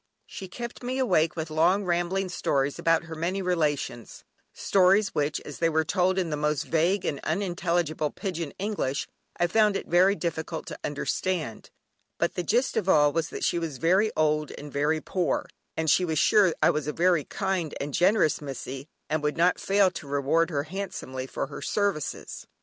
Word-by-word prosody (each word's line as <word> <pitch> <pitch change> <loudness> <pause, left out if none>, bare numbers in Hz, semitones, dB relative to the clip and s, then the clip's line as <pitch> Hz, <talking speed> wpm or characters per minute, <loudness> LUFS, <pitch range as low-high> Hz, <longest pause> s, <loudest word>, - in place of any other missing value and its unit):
She 190 - -8
kept 235 +6 -7
me 255 +1 -3
awake 180 -11 +2
with 160 -1 -4
long 175 +6 +3
rambling 180 +2 0
stories 140 -5 -1
about 165 0 +2
her 165 -1 -8
many 170 +5 -2
relations, 150 -9 -2 0.3
stories 195 +1 +3
which, 150 0 0
as 145 - -9
they 165 - +3
were 160 0 +2
told 185 +3 +1
in 175 -4 0
the - - 0
most 150 0 0
vague 175 +4 +1
and 140 - -2
unintelligible 175 -5 -1
"pigeon 170 -5 -4
English" 190 -9 -2 0.3
I 175 - +2
found 210 +3 +3
it - - -6
very 185 +3 +4
difficult 165 -3 -4
to - - -8
understand, 150 - -2 0.5
but 170 - 0
the 180 - -2
gist 240 +8 +1
of 195 - 0
all 145 -4 +5
was 165 -1 -1
that - - -6
she 175 - +1
was 160 -5 -4
very 190 +8 +3
old 150 -1 +2
and 145 0 -9
very 150 +2 +1
poor, 180 +2 -1 0.3
and 160 0 -1
she 180 - +4
was 160 -3 -1
sure 200 +3 +5
I - - +6
was 150 -1 -3
a 150 - -1
very 175 -2 +3
kind 175 +1 -2
and 140 0 -4
generous 180 -3 +3
"Missie," 135 0 -6 0.2
and 155 0 -1
would 150 +1 -1
not 175 +2 +3
fail 195 -1 +3
to 155 - -8
reward 145 +4 +1
her 145 -4 -1
handsomely 150 -7 -5
for - - -3
her 140 - -9
services. 200 -7 -2
165 Hz, 185 wpm, -27 LUFS, 150-185 Hz, 0.5 s, I